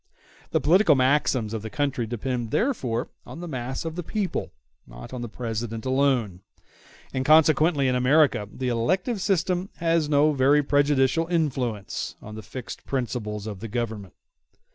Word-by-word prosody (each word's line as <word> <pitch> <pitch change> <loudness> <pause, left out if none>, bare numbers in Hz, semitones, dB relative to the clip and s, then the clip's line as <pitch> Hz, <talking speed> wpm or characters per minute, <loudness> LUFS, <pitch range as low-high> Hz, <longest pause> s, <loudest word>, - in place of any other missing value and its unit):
The - - +1
political 175 -1 +5
maxims 130 -4 +2
of 110 - -3
the 110 - -6
country 135 -1 -1
depend 120 0 -3
therefore 130 - -1
on - - -10
the 175 - -6
mass 130 -1 -4
of 160 -1 -4
the 175 - -3
people, 200 +2 -3 0.4
not - - -11
on 125 - -5
the 120 - -5
President 115 0 -4
alone; 130 -8 +1 0.7
and 130 - -1
consequently 155 -1 +4
in 130 - +2
America 125 -4 +3
the 130 -1 -3
elective 185 - 0
system 185 0 0
has 165 -2 +1
no 150 +1 +4
very 140 +2 +4
prejudicial 145 +2 +2
influence 130 - -2
on 105 - -10
the 110 - -7
fixed 115 +4 -8
principles 115 -5 -3
of 105 -3 -6
the 115 - -6
Government. 110 -4 -4
130 Hz, 155 wpm, -25 LUFS, 115-155 Hz, 0.7 s, political